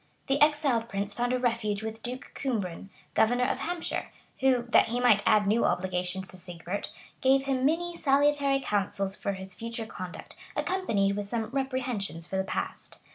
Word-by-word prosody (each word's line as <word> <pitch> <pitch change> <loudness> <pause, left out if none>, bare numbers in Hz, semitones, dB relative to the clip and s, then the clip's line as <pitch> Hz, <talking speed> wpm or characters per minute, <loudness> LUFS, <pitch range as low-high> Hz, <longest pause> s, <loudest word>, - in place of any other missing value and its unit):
The 275 +1 +1
exiled 290 -6 +3
prince 200 0 -2
found 245 0 0
a 255 - +2
refuge 230 -4 0
with 220 0 -5
Duke 250 +2 -6
Cumbran, 200 -8 -3 0.2
governor 245 +3 +3
of 250 - 0
Hampshire; 345 0 -2 0.3
who, 260 -2 +3
that - - +6
he 240 +2 -1
might 220 -4 +5
add 215 -1 +5
new 215 +4 +3
obligations 180 +1 0
to 185 - -6
Sigebert, 180 +2 -5 0.3
gave 265 +1 +4
him 265 -1 +2
many 345 +3 0
salutary 285 -2 +3
counsels 195 -4 -1
for 200 - -2
his 190 0 -7
future 230 +1 -4
conduct, 185 -4 -8 0.2
accompanied 215 - +1
with 205 -1 -4
some 225 0 -2
reprehensions 255 -10 -2
for 190 +2 -3
the 190 - +1
past. 190 - -4
230 Hz, 170 wpm, -29 LUFS, 195-265 Hz, 0.3 s, that